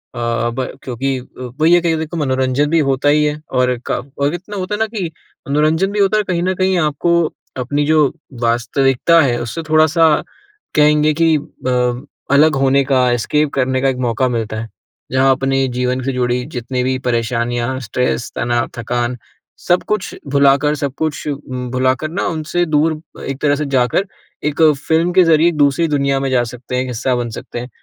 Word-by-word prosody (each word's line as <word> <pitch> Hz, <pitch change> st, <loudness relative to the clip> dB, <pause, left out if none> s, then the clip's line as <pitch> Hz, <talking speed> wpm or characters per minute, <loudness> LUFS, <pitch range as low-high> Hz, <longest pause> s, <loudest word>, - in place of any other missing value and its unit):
अ -, -, -5 dB, 0.3 s
अब 120 Hz, +2 st, -3 dB, 0.2 s
क्योंकि 130 Hz, +1 st, -2 dB, 0.4 s
वही 160 Hz, +2 st, +4 dB
है 175 Hz, -, +6 dB
कि 165 Hz, -1 st, +1 dB
देखो 160 Hz, +2 st, -4 dB
मनोरंजन 130 Hz, 0 st, 0 dB
भी 165 Hz, +1 st, +3 dB
होता 135 Hz, +2 st, +2 dB
ही 150 Hz, +1 st, +3 dB
है, 150 Hz, 0 st, -2 dB
और 125 Hz, 0 st, +1 dB
क 135 Hz, -, -3 dB, 0.2 s
इतना 190 Hz, +4 st, -8 dB
होता 185 Hz, +2 st, -2 dB
है -, -, -6 dB
ना 220 Hz, -, +2 dB
कि 200 Hz, -7 st, -4 dB, 0.4 s
मनोरंजन 155 Hz, +6 st, +2 dB
भी 205 Hz, -, -2 dB
होता 200 Hz, +1 st, +3 dB
है, -, -, +3 dB
और -, -, -7 dB
कहीं 170 Hz, -1 st, 0 dB
न 185 Hz, +1 st, +1 dB
कहीं 185 Hz, 0 st, +1 dB
आपको 155 Hz, +2 st, +1 dB, 0.4 s
अपनी 145 Hz, +4 st, -1 dB
जो 155 Hz, -2 st, +4 dB, 0.4 s
वास्तविकता 130 Hz, +7 st, +2 dB
है, 125 Hz, -5 st, +1 dB
उससे 120 Hz, +7 st, -4 dB
थोड़ा-सा 155 Hz, 0 st, +4 dB, 0.6 s
कहेंगे 150 Hz, 0 st, +4 dB
कि 165 Hz, -1 st, +4 dB
अ, 125 Hz, -3 st, -2 dB, 0.3 s
अलग 155 Hz, +1 st, +5 dB
होने 135 Hz, 0 st, +3 dB
का, 130 Hz, -2 st, +2 dB
एस्केप 145 Hz, +5 st, 0 dB
करने 130 Hz, -1 st, 0 dB
का 135 Hz, -, +2 dB
एक 130 Hz, -, -2 dB
मौका 120 Hz, +3 st, +1 dB
मिलता 110 Hz, -2 st, -3 dB
है। 115 Hz, -, -8 dB, 0.4 s
जहाँ 130 Hz, +1 st, +4 dB
अपने 135 Hz, 0 st, +1 dB
जीवन 125 Hz, +1 st, -1 dB
से 135 Hz, -, -1 dB
जुड़ी 125 Hz, 0 st, 0 dB
जितनी 125 Hz, 0 st, -3 dB
भी 130 Hz, +1 st, 0 dB
परेशानियाँ, 120 Hz, +1 st, -1 dB
स्ट्रेस, 125 Hz, 0 st, -2 dB
तनाव, 120 Hz, 0 st, 0 dB
थकान, 120 Hz, +1 st, -2 dB, 0.4 s
सब 175 Hz, +1 st, +1 dB
कुछ 210 Hz, -4 st, -2 dB
भुलाकर, 140 Hz, +1 st, +3 dB
सब 140 Hz, -2 st, -3 dB
कुछ 155 Hz, -1 st, -3 dB, 0.5 s
भुलाकर 130 Hz, +4 st, 0 dB
ना, 180 Hz, +5 st, -2 dB
उनसे 165 Hz, +2 st, -1 dB
दूर 155 Hz, 0 st, +1 dB, 0.2 s
एक 135 Hz, 0 st, -5 dB
तरह 145 Hz, -1 st, +3 dB
से 150 Hz, +1 st, -3 dB
जाकर, 125 Hz, +9 st, +2 dB, 0.4 s
एक 150 Hz, +1 st, -1 dB, 0.3 s
फ़िल्म 165 Hz, +2 st, +2 dB
के 185 Hz, -, +6 dB
ज़रिए 165 Hz, -1 st, +4 dB
एक 170 Hz, -, -4 dB
दूसरी 145 Hz, +3 st, +3 dB
दुनिया 140 Hz, -2 st, +1 dB
में 135 Hz, 0 st, -1 dB
जा 125 Hz, -2 st, +3 dB
सकते 125 Hz, +1 st, -7 dB
हैं, 125 Hz, -, +1 dB
एक -, -, -6 dB
हिस्सा 125 Hz, +1 st, -1 dB
बन 120 Hz, -1 st, -2 dB
सकते -, -, -7 dB
हैं। 125 Hz, +1 st, -7 dB
140 Hz, 190 wpm, -17 LUFS, 125-155 Hz, 0.6 s, है